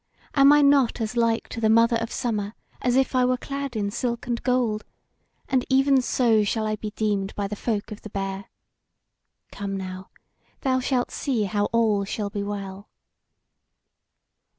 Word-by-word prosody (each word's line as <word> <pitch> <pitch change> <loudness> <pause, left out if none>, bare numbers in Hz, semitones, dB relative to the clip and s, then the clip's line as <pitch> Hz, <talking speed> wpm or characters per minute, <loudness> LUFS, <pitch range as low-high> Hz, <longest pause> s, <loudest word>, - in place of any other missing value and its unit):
am 275 -1 +6
I 295 0 +6
not 280 -4 +4
as 225 +1 -3
like 230 -1 +1
to 230 - -6
the 220 - +3
Mother 230 +1 +5
of 230 0 -4
Summer 215 -3 -2 0.3
as 245 -1 +1
if 265 0 +2
I 255 -1 +3
were 255 0 +2
clad 275 -1 -5
in 200 -2 -1
silk 235 +1 -2
and 240 -1 -2
gold? 245 -4 0 0.6
and 260 -2 +1
even 270 0 +4
so 230 -4 +2
shall 215 +2 -1
I 215 0 0
be 215 0 -5
deemed 205 -2 -1
by 200 -1 -2
the 210 - -5
folk 215 0 -3
of 210 - -8
the 215 - -9
Bear. 195 -1 -4 1.1
Come 200 -1 -4
now, 185 0 -7 0.5
thou 260 -1 +1
shalt 250 -1 0
see 250 -7 -1
how 205 +1 0
all 220 -3 +2
shall 200 +1 -4
be 205 -1 -3
well." 200 -1 -6
225 Hz, 175 wpm, -24 LUFS, 205-250 Hz, 1.1 s, am